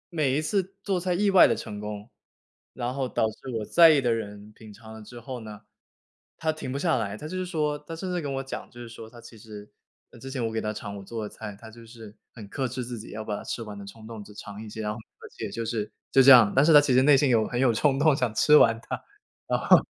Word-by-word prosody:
······每 140 -3 +1
一 - - 0
次 195 +2 -1
做 190 -3 0
菜 180 0 -1
意 200 +2 +2
外 190 - +8
的 - - +1
成 105 -1 -7
功， 105 0 -7 0.7
然 125 0 -3
后 135 -2 -2
导 - - +1
致 130 +4 -11
我 105 - -4
在 170 -1 +7
意 150 -3 +5
的 120 -2 +1
人 105 -1 -6
品 110 -1 -14
尝 110 +2 -13
了 110 - -10
之 120 +3 -11
后 125 +1 -7
呢， 105 -1 -10 0.8
她 160 -1 0
停 155 -4 -7
不 140 - -3
下 165 -5 +1
来。 105 -2 -3
她 155 - -8
就 185 - -6
是 185 - -2
说 150 -4 -2
她 165 +2 -9
甚 180 +2 -5
至 175 - -1
跟 140 -2 -4
我 135 - -3
讲， 135 - -7
就 120 - -15
是 120 - -8
说 110 -1 -11
她 120 - -14
其 115 -1 -14
实 105 -1 -11 0.5
之 135 - -8
前， 125 -4 -2
我 110 - -2
给 110 - -2
她 105 - -2
尝 100 -1 -7
我 100 - -9
做 110 +2 -6
的 105 - -5
菜， 105 -3 -9
她 110 -1 -12
就 115 0 -14
是 110 -2 -13 0.2
很 110 -4 -10
克 130 +5 -3
制 125 +1 -5
自 120 -2 -6
己 110 - -10
要 110 0 -6
把 105 -1 -3
它 - - -8
吃 115 - -5
完 105 -2 -9
的 100 - -8
冲 110 +2 -12
动， 110 -3 -8
只 105 - -14
尝 105 0 -9
一 110 - -9
些。 110 - -7
然 105 0 -2
后， 115 - -9
而 - - -16
且 110 - -4
就 115 +3 -5
是 110 -2 -3 0.2
就 135 - +6
这 135 - +7
样， 115 -5 +8
但 135 - +5
是 165 - +5
她 145 - +10
其 135 -3 +1
实 130 - +5
内 140 -1 +6
心 140 -1 +2
有 115 -3 +3
很 120 - -3
有 125 -3 +3
冲 135 +3 +2
动 150 -1 +4
想 125 -4 -1
吃 150 - +5
完 115 -3 +4
它。 - - -5 0.4
然 - - 0
后 - - +6
120 Hz, 310 characters per minute, -26 LUFS, 110-140 Hz, 0.8 s, 她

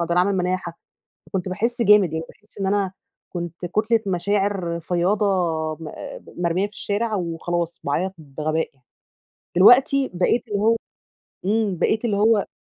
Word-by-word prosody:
فباعمل 180 +3 +2
مناحة، 180 -2 -2 0.5
فكنت 185 -1 -3
باحس 235 +6 -1
جامد، 205 -6 +5
يعني 160 0 -2
باحس 210 +1 -18
إن 195 - -1
أنا 195 -2 +1 0.4
كنت 175 0 -5
كُتلة 215 +5 +2
مشاعر 195 -2 0
فياضة 180 +5 +1 0.5
م 155 -1 -8 0.5
مرمية 175 +3 +1
في 210 - -22
الشارع، 215 +1 -1
وخلاص 170 -1 -2
باعيط 180 +7 -1
بغباء 155 +2 -2
يعني. 130 -2 -35 0.7
دلوقتي 265 +7 +6
بقيت 210 +7 +1
اللي 205 -2 -1
هو 225 +2 +4 0.7
إمم، 210 -2 +1
بقيت 215 +2 +1
اللي 210 -4 +1
هو 210 0 +3
190 Hz, 140 wpm, -23 LUFS, 170-210 Hz, 0.7 s, دلوقتي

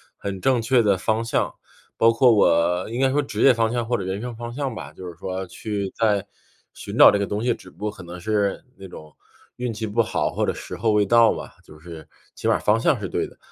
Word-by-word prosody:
很 100 -1 -5
正 125 +4 +2
确 120 +2 +3
的 100 -3 +2
方 110 +5 -1
向 115 - -1 0.4
包 115 0 +4
括 120 +2 +5
我 90 -4 +3
应 120 +3 -3
该 135 - +4
说 145 +2 +2
职 140 - -5
业 135 - +7
方 115 -1 +1
向 120 -1 -1
或 120 +1 0
者 95 - -5
人 95 +2 -3
生 125 0 -5
方 120 +1 -7
向 135 -1 -3
吧， 75 -9 -8
就 95 - -10
是 90 - -7
说 95 0 -4
去 100 +1 -4
在 105 -3 +1 0.5
寻 - - -8
找 - - +9
这 100 - 0
个 100 - -1
东 105 +2 -3
西， 120 0 +2
只 - - -13
不 - - -24
过 105 0 -2
可 100 - -13
能 90 0 -9
是 100 0 -1
那 95 0 -10
种 75 -4 -12 0.4
运 125 -2 -3
气 110 +1 -4
不 110 +2 +1
好 110 - -1
或 - - -1
者 - - -1
时 - - -8
候 110 -2 +1
未 105 -1 +3
到 115 +2 +5
吧， - - -9
就 75 - -15
是 85 -1 -11 0.3
起 - - -5
码 - - +4
儿 - - 0
方 105 +2 +2
向 145 +3 +2
是 100 -4 -5
对 - - -2
的。” - - -19
110 Hz, 280 characters per minute, -23 LUFS, 95-115 Hz, 0.5 s, 找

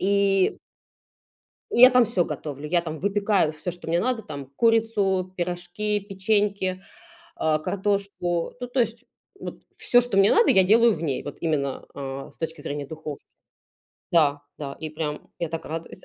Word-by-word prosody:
И, 195 -1 +3 1.2
и 240 - +3
я 255 - +12
там 250 -1 +5
всё 200 -6 +1
готовлю. 150 -2 -6
Я 175 +1 +2
там 160 -2 -6
выпекаю 200 -3 +2
всё, 155 +3 -4
что 175 -1 -11
мне 170 +1 +2
надо, 245 +2 0
там: 140 -3 -7
курицу, 205 -5 +2
пирожки, 180 +4 -2
печеньки, 200 -1 0 0.6
э, 155 -1 +2
картошку. 195 -2 -1
Ну, 245 - -4
то 250 +2 -2
есть 230 0 -3 0.4
вот - - -7
всё, 245 0 +4
что 235 -5 -2
мне 195 +1 +6
надо, 460 - +5
я 190 - +6
делаю 225 +4 +5
в 165 - -6
ней. 140 -5 -2
Вот 145 - -7
именно, 145 -5 -1
э, 135 -1 -6
с - - -19
точки 160 -1 -5
зрения 145 0 -4
духовки. 155 -1 -8 0.9
Да, 145 -4 +3 0.2
да, 140 -2 -6
и 155 - -5
прям 150 -1 -5
я 170 - -2
так 165 0 -5
радуюсь, 165 +1 -7
180 Hz, 170 wpm, -25 LUFS, 155-205 Hz, 1.2 s, я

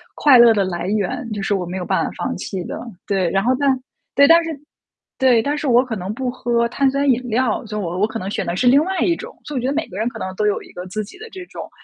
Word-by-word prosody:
快 285 -4 +6
乐 235 -1 +8
的 205 -2 +2
来 175 -1 -3
源， 225 +5 -2
就 205 - -4
是 200 - 0
我 180 -2 -2
没 180 - -6
有 180 - -4
办 - - +1
法 - - -4
放 - - -2
弃 185 -3 -5
的， - - -6 0.3
对。 190 -4 0
然 195 0 +1
后 250 +3 +3
但 275 -2 +3 0.4
对， 280 - +7
但 330 +3 +7
是 - - -4 0.7
对， 255 -3 +4
但 290 +3 -1
是 295 - -3
我 245 0 +5
可 245 -4 -4
能 185 +2 -4
不 255 +1 -3
喝 235 -1 0
碳 275 +2 +2
酸 275 +1 +1
饮 250 -1 +3
料， 235 0 0
所 210 -1 -5
以 - - -2
我 180 -1 -3
我 210 - +3
可 220 - -5
能 195 -3 -4
选 - - -2
的 170 - -2
是 220 - 0
另 265 +4 +6
外 380 0 -2
一 345 - +3
种， 475 +7 -10
所 295 - -5
以 - - +1
我 - - -3
觉 255 - -1
得 275 - 0
每 310 +2 -1
个 185 - -8
人 220 +2 0
可 240 - -5
能 185 - -4
都 210 - +1
有 205 - 0
一 - - -15
个 180 - -8
自 215 +4 -3
己 205 - -13
的 445 +1 -10
这 375 -1 -8
种 - - -8
235 Hz, 335 characters per minute, -20 LUFS, 195-275 Hz, 0.7 s, 乐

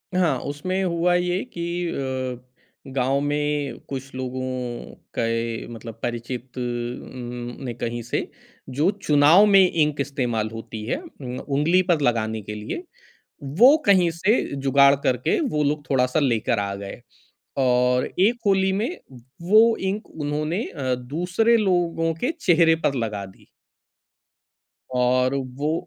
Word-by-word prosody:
हाँ, 180 -3 +2
उसमें 185 +7 -3
हुआ 175 0 +1
ये 180 +2 0
कि 170 - -4 0.2
अ, 130 -2 -6
गाँव 135 +2 +1
में 145 -2 -1
कुछ 135 -1 -6
लोगों 130 0 -4 0.8
के 115 0 -1
मतलब 115 -1 -9
परिचित 120 +2 -5
उम, 120 0 -5
ने 120 - -3
कहीं 120 +1 -4
से 120 - -3 0.4
जो 145 +7 +1 0.2
चुनाव 150 +7 +6
में 200 -2 +6
इंक 150 -3 +1
इस्तेमाल 125 -6 -1
होती 110 -1 -7
है 115 - -1
उम, 130 - -8
उँगली 150 +6 +2
पर 165 -4 +3
लगाने 110 -3 0
के 105 +1 -7
लिए, 105 - -5 0.6
वो 210 - +6
कहीं 185 -4 +5
से 185 +8 +2 0.2
जुगाड़ 140 +1 +5
करके 125 0 +1
वो 150 -7 0
लोग 145 0 -2
थोड़ा-सा 130 +2 +2
लेकर 115 -5 +1
आ 100 -1 -2
गए 100 +4 -8 0.6
और 125 0 +3
एक 225 +6 +3
होली 190 -1 +3
में 215 +6 0 0.6
वो 225 +2 +6 0.2
इंक 210 +2 -6
उन्होंने 155 +6 -2
अ, 130 -5 -2
दूसरे 180 - +1
लोगों 175 -5 +1
के 265 - +1
चेहरे 165 - +4
पर 140 - +2
लगा 105 -4 -3
दी। 95 - -17 1.5
और 125 +1 +2
वो 140 +3 -2
140 Hz, 135 wpm, -23 LUFS, 125-170 Hz, 1.5 s, चुनाव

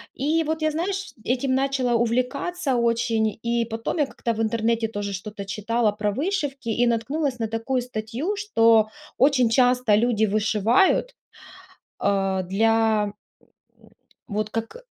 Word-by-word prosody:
И 315 +4 +1
вот 315 +1 -2
я 310 0 +1
знаешь, 385 +5 -3
этим 260 +1 0
начала 265 -2 0
увлекаться 255 +6 0
очень. 230 -2 +1
И 235 0 0
потом 225 +7 -4
я 290 - +4
как-то 235 -3 -3
в 225 - -3
интернете 225 0 0
тоже 205 -2 -4
что-то 200 +1 -6
читала 215 +3 0
про 205 0 -2
вышивки 285 - -2
и 240 +2 +2
наткнулась 255 +3 -1
на 225 - -1
такую 225 +3 -1
статью, 245 - -4
что 230 - +3 0.3
очень 255 -3 +4
часто 250 -2 +3
люди 220 -1 +2
вышивают, 215 - +2 0.8
а, 195 -1 0
для, 220 +3 +2
м, 205 - -6 0.7
м, - - -20 0.4
вот 210 -1 -2
как, 225 - -4
230 Hz, 140 wpm, -24 LUFS, 215-270 Hz, 0.8 s, я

